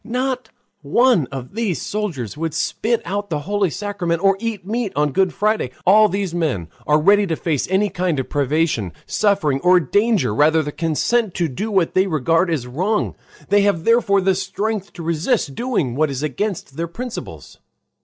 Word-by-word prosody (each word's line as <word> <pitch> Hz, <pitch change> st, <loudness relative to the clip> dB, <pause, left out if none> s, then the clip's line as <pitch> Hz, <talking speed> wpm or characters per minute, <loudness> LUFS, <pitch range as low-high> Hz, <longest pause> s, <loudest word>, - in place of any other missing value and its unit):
Not 255 Hz, +2 st, -2 dB, 0.3 s
one 185 Hz, -, +3 dB
of 130 Hz, +1 st, -8 dB
these 215 Hz, -6 st, -1 dB
soldiers 175 Hz, -, -4 dB
would 160 Hz, 0 st, -3 dB
spit 230 Hz, +7 st, -1 dB
out 200 Hz, +3 st, -3 dB
the 150 Hz, -3 st, -2 dB
holy 200 Hz, +2 st, 0 dB
sacrament 180 Hz, -1 st, -3 dB
or 195 Hz, 0 st, +5 dB
eat 220 Hz, -4 st, -4 dB
meat 220 Hz, 0 st, -2 dB
on 150 Hz, 0 st, +1 dB
Good 190 Hz, +5 st, +2 dB
Friday. 215 Hz, -, 0 dB, 0.2 s
All 215 Hz, +3 st, +6 dB
these 195 Hz, -3 st, -2 dB
men 145 Hz, -, -1 dB, 0.2 s
are 150 Hz, +1 st, +4 dB
ready 200 Hz, +5 st, +4 dB
to 165 Hz, -, -1 dB
face 155 Hz, -4 st, -1 dB
any 195 Hz, +2 st, +2 dB
kind 175 Hz, -5 st, -1 dB
of 130 Hz, -, -3 dB
privation, 145 Hz, -, 0 dB
suffering, 195 Hz, -10 st, +1 dB
or 180 Hz, 0 st, +5 dB
danger 205 Hz, -, +1 dB
rather 155 Hz, +6 st, +3 dB
than 145 Hz, 0 st, -5 dB
consent 175 Hz, +7 st, 0 dB
to 175 Hz, -2 st, 0 dB
do 180 Hz, -, -4 dB
what 190 Hz, -5 st, +1 dB
they 190 Hz, +1 st, +3 dB
regard 165 Hz, +2 st, +1 dB
as 150 Hz, -7 st, -1 dB
wrong. 185 Hz, -, -1 dB, 0.4 s
They 205 Hz, +1 st, +4 dB
have 200 Hz, -5 st, +1 dB
therefore 230 Hz, -3 st, +3 dB
the 190 Hz, 0 st, +3 dB
strength 195 Hz, +2 st, -3 dB
to 170 Hz, -, -8 dB
resist 165 Hz, -, 0 dB
doing 215 Hz, -, -1 dB
what 155 Hz, +2 st, +1 dB
is 135 Hz, +1 st, -4 dB
against 155 Hz, -, -3 dB
their 170 Hz, +1 st, -2 dB
principles. 240 Hz, +8 st, -8 dB
180 Hz, 180 wpm, -20 LUFS, 155-205 Hz, 0.4 s, All